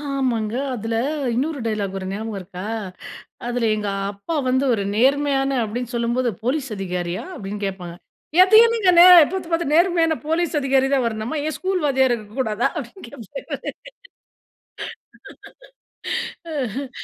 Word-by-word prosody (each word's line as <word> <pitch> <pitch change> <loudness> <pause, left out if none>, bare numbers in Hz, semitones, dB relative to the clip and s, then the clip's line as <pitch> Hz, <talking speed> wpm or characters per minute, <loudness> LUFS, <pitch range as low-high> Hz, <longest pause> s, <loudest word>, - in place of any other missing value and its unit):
ஆமாங்க. 255 -6 -1 0.2
அதில 225 -1 -3 0.4
இன்னொரு 285 +5 -1
டயலாக் 205 -3 -2
வருங்க. 190 0 -4
ஞாபகம் 220 -2 -5
இருக்கா, 185 0 -8 0.8
அதில 240 -1 0
எங்க 210 -1 -3 0.2
அப்பா 205 +12 -5
வந்து 260 +2 +2
ஒரு 205 - -1
நேர்மையான 275 +1 +2
அப்டின்னு 240 +3 -5
சொல்லும்போது 235 +1 0
"போலீஸ் 270 +2 -1
அதிகாரியா?" 180 -2 -3
அப்டின்னு 205 - -5
கேட்பாங்க 180 -3 -6 0.5
"எதையும் 445 +4 +6
நீங்க 400 -5 +4
நே 345 - +10 0.3
பார்த்து 375 -3 -4
பார்த்து 330 -3 0
நேர்மையான 335 -1 +3
போலீஸ் 330 +1 0
அதிகாரி 270 -1 +2
தான் 265 -2 +2
வரணுமா? 220 +5 -3
ஏன் 310 -3 -2
ஸ்கூல் 370 -2 -1
வாத்தியாரு 265 -3 +3
இருக்கக்கூடாதா?" 220 +2 -1
அப்டின்னு 290 +7 -9
கேட்பா - - -7 2.9
அ - - -6 0.2
ஹ்ம். 275 0 -4
255 Hz, 130 wpm, -22 LUFS, 215-300 Hz, 2.9 s, நே